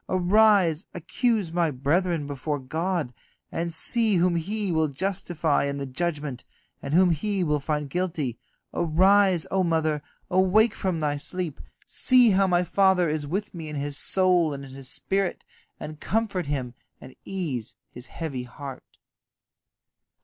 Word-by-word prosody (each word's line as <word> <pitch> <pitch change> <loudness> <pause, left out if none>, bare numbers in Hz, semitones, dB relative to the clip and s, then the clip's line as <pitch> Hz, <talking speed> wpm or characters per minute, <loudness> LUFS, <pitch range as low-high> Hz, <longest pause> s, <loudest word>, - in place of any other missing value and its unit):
Arise, 185 -2 +3
accuse 205 +2 0
my 170 -1 +1
brethren 155 +4 0
before 145 +1 -3
God, 160 +1 -2 0.4
and 170 0 -2
see 220 +5 +1
whom 180 0 +3
He 200 +4 -2
will 160 -1 +2
justify 165 -1 -1
in 140 0 -2
the 140 - -3
judgment, 145 -2 -3 0.4
and 140 +2 -2
whom 180 0 +5
He 190 +4 0
will 150 -3 +1
find 150 +1 -2
guilty. 155 -7 -2 0.3
Arise, 185 +2 +4
O 190 -1 +2
mother, 160 -3 0 0.3
awake 190 +4 +3
from 185 -4 -2
thy 145 -1 0
sleep, 170 0 -4 0.2
see 250 -3 +4
how 195 0 +3
my 175 -1 +2
father 190 -2 +3
is 150 -1 -2
with 200 +7 -3
me 165 -3 -7
in 150 - -6
his 145 0 -3
soul 180 -2 +2
and 140 0 -8
in 135 - -12
his 135 -1 -6
spirit, 195 -1 -1 0.3
and 155 0 -8
comfort 200 -6 -1
him 130 -4 -3 0.3
and 130 - -13
ease 150 - -4 0.2
his 125 +1 -10
heavy 150 -6 -5
heart." 135 +1 -10
170 Hz, 150 wpm, -25 LUFS, 145-190 Hz, 0.4 s, whom